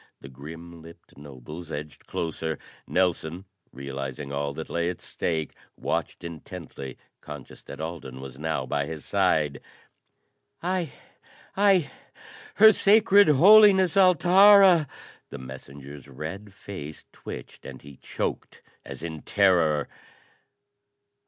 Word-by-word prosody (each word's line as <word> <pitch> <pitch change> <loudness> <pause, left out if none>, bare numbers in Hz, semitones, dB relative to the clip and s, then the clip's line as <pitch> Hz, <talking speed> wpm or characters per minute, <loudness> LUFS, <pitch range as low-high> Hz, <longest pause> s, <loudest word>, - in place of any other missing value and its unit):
The 70 - -12
grim 80 +5 -11
lipped 85 +1 -16
nobles 75 +4 -10
edged 75 -1 -8
closer. 80 -2 -3 0.3
Nelson, 90 0 -1 0.3
realizing 70 +1 -6
all 70 0 -2
that 80 - -6
lay 85 0 -1
at 90 - -6
stake, 80 -3 -3 0.2
watched - - -3
intently, 85 -4 -9 0.2
conscious 75 -3 -11
that - - -10
Alden 80 -5 -7
was 65 0 -10
now 75 -4 -2
by 70 +2 -2
his 80 -3 -7
side. 75 -2 +1 1.0
"I 180 -4 -1 0.6
I, 195 -5 +3 0.6
Her 220 +1 +8
Sacred 205 -1 +5
Holiness, 190 +4 +6
Altara 185 -1 +6 0.2
." - - -26
The - - -8
messenger's 70 +2 -11
red 80 +10 -8
face 85 -5 -9
twitched - - -10
and - - -10
he 70 -1 -13
choked - - -5 0.2
as - - -9
in 80 -2 -6
terror. 85 -7 +2
80 Hz, 115 wpm, -25 LUFS, -, 1.0 s, Her